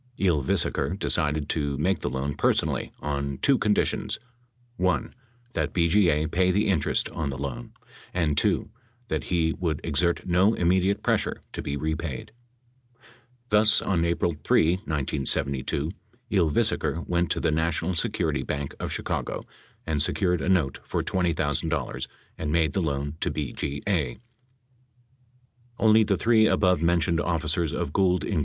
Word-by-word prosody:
Ylvisaker 85 Hz, +1 st, 0 dB
decided 75 Hz, -6 st, 0 dB
to 70 Hz, -3 st, -1 dB
make 90 Hz, +4 st, +1 dB
the -, -, -2 dB
loan 70 Hz, +2 st, -2 dB
personally -, -, 0 dB
on 70 Hz, -2 st, -2 dB
two 135 Hz, -, +3 dB
conditions: 105 Hz, -2 st, +1 dB, 0.6 s
(1) 90 Hz, -7 st, 0 dB, 0.4 s
That -, -, -1 dB
BGA 85 Hz, -3 st, +3 dB
pay 90 Hz, +1 st, +2 dB
the 105 Hz, +3 st, +2 dB
interest 85 Hz, -7 st, +1 dB
on 75 Hz, -3 st, -3 dB
the 70 Hz, -, -4 dB
loan; 70 Hz, -3 st, -5 dB, 0.4 s
and 80 Hz, -5 st, 0 dB
(2) 105 Hz, -, +1 dB, 0.4 s
that -, -, -2 dB
he 80 Hz, -2 st, +1 dB
would 80 Hz, -5 st, -2 dB
exert 85 Hz, +2 st, +1 dB
no 95 Hz, +5 st, +3 dB
immediate 95 Hz, +3 st, +2 dB
pressure -, -, 0 dB
to -, -, -4 dB
be 70 Hz, -, -3 dB
repaid. 80 Hz, +2 st, -3 dB, 1.2 s
Thus, 105 Hz, +1 st, +5 dB
on 85 Hz, -4 st, 0 dB
April 85 Hz, -1 st, 0 dB
3, 85 Hz, +3 st, +3 dB
1972, 70 Hz, -, -1 dB, 0.4 s
Ylvisaker 85 Hz, -2 st, +1 dB
went 85 Hz, 0 st, +1 dB
to -, -, 0 dB
the -, -, +1 dB
National 80 Hz, +3 st, 0 dB
Security 85 Hz, -, -1 dB
Bank 70 Hz, -1 st, -4 dB
of -, -, -3 dB
Chicago -, -, -3 dB, 0.4 s
and 75 Hz, -3 st, 0 dB
secured 90 Hz, +1 st, +1 dB
a -, -, -1 dB
note 85 Hz, -8 st, +2 dB
for -, -, -2 dB
$20,000 80 Hz, -6 st, -1 dB, 0.3 s
and 75 Hz, -1 st, -2 dB
made 80 Hz, -1 st, +2 dB
the 95 Hz, -, 0 dB
loan 70 Hz, -1 st, -2 dB
to -, -, +1 dB
BGA. 70 Hz, -, -2 dB, 1.6 s
Only 110 Hz, 0 st, +5 dB
the 100 Hz, -2 st, +1 dB
three 110 Hz, -1 st, +4 dB
above 90 Hz, -6 st, +3 dB
mentioned 85 Hz, 0 st, +2 dB
officers 85 Hz, -1 st, 0 dB
of 70 Hz, -, -3 dB
Gould, 90 Hz, -2 st, +2 dB
Inc. 95 Hz, -7 st, 0 dB
85 Hz, 140 wpm, -26 LUFS, 75-90 Hz, 1.6 s, Thus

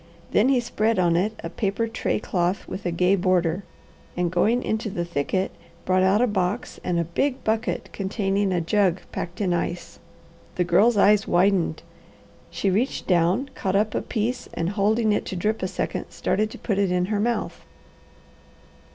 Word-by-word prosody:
Then 225 Hz, +6 st, +4 dB
he 265 Hz, -2 st, +4 dB
spread 225 Hz, -2 st, 0 dB
on 175 Hz, -2 st, +3 dB
it 205 Hz, +6 st, 0 dB
a -, -, -4 dB
paper 210 Hz, +2 st, -1 dB
tray 225 Hz, -, -1 dB
cloth 180 Hz, -2 st, -1 dB
with 190 Hz, -, -5 dB
a -, -, 0 dB
gay 180 Hz, +3 st, +3 dB
border, 180 Hz, -1 st, +1 dB, 0.5 s
and 175 Hz, -1 st, 0 dB
going 225 Hz, +8 st, +2 dB
into 220 Hz, 0 st, -2 dB
the 175 Hz, -3 st, -3 dB
thicket 175 Hz, +4 st, -1 dB, 0.3 s
brought 185 Hz, 0 st, +3 dB
out 195 Hz, +5 st, +4 dB
a -, -, +5 dB
box 205 Hz, 0 st, -2 dB
and 175 Hz, -1 st, 0 dB
a -, -, +2 dB
big 255 Hz, -, -1 dB
bucket 220 Hz, +2 st, -1 dB
containing 195 Hz, 0 st, -1 dB
a 175 Hz, -2 st, +1 dB
jug 185 Hz, +1 st, +1 dB
packed 175 Hz, +1 st, -5 dB
in 185 Hz, -3 st, +1 dB
ice. 175 Hz, 0 st, -3 dB, 0.6 s
The 180 Hz, -, +2 dB
Girl's 200 Hz, +7 st, +4 dB
eyes 205 Hz, 0 st, +4 dB
widened. 175 Hz, -3 st, +2 dB, 0.7 s
She 195 Hz, -, -1 dB
reached 230 Hz, +8 st, 0 dB
down, 185 Hz, +9 st, +2 dB
caught 195 Hz, -6 st, -2 dB
up 210 Hz, +2 st, +2 dB
a -, -, 0 dB
piece, 235 Hz, +2 st, -2 dB
and 170 Hz, +1 st, -1 dB
holding 215 Hz, +2 st, +2 dB
it 205 Hz, -, +1 dB
to -, -, -5 dB
drip 215 Hz, +5 st, -1 dB
a 185 Hz, -, 0 dB
second -, -, -3 dB
started 215 Hz, +2 st, -1 dB
to -, -, -9 dB
put 200 Hz, -4 st, -1 dB
it 195 Hz, -2 st, +2 dB
in 180 Hz, 0 st, +1 dB
her 205 Hz, -, +1 dB
mouth. 235 Hz, +2 st, -1 dB
195 Hz, 180 wpm, -24 LUFS, 180-215 Hz, 0.7 s, a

